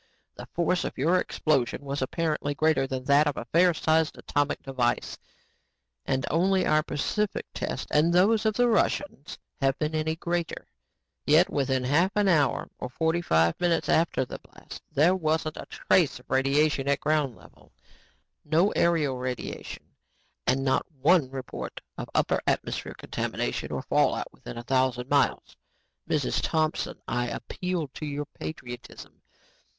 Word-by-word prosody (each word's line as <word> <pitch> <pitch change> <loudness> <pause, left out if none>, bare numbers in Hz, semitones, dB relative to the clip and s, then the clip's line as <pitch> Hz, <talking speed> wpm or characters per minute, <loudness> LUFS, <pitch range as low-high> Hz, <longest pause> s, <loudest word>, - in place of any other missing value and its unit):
The - - -10
force 175 +1 +1
of - - -5
your 165 +7 +3
explosive 140 -8 0
was 140 0 -4
apparently 150 +1 -1
greater 155 -3 +2
than 130 -1 -4
that 145 +2 +4
of 145 - -1
a - - -4
fair 175 +8 +4
sized 160 -1 +1
atomic 145 0 -1
device 130 -3 -1 0.9
and 130 0 0
only 185 +3 +2
our 155 0 +3
Pacific 185 +7 -2
tests - - -3
and 155 +3 +4
those 205 +5 +4
of 215 - +1
the 245 0 +3
Russians 230 - 0 0.2
have 135 -1 +1
been 155 0 -2
any 160 0 0
greater. 170 0 -3 0.6
Yet 160 +5 +5
within 130 -2 0
a - - -2
half 175 +8 +2
hour 175 -9 +2
or 125 - -4
forty 160 +5 0
five 80 - +2
minutes 175 -2 +1
after 160 -5 +2
the - - -8
blast - - -12
there 165 +6 +4
wasn't 155 -2 -1
a - - -7
trace 170 -9 +2
of 125 - -19
radiation 140 +1 +2
at 140 0 +2
ground 150 -5 0
level, - - -19 0.7
no 170 +6 +2
aerial 150 -7 +1
radiation 125 0 -5 0.6
and 135 +2 +2
not 130 - +2 0.2
one 150 -1 +4
report 130 -1 -6 0.2
of - - -5
upper - - +2
atmosphere - - -1
contamination - - -3
or - - -3
fallout - - +1
within - - -10
a 120 - -6
thousand 130 0 0
miles. 140 -1 +1 0.5
"Mrs. - - 0
Thompson, 155 -1 -1
I 120 +1 -1
appeal 180 +5 -3
to 155 - -7
your 145 0 -3
patriotism. 125 -5 -9
150 Hz, 150 wpm, -27 LUFS, 135-170 Hz, 0.9 s, Yet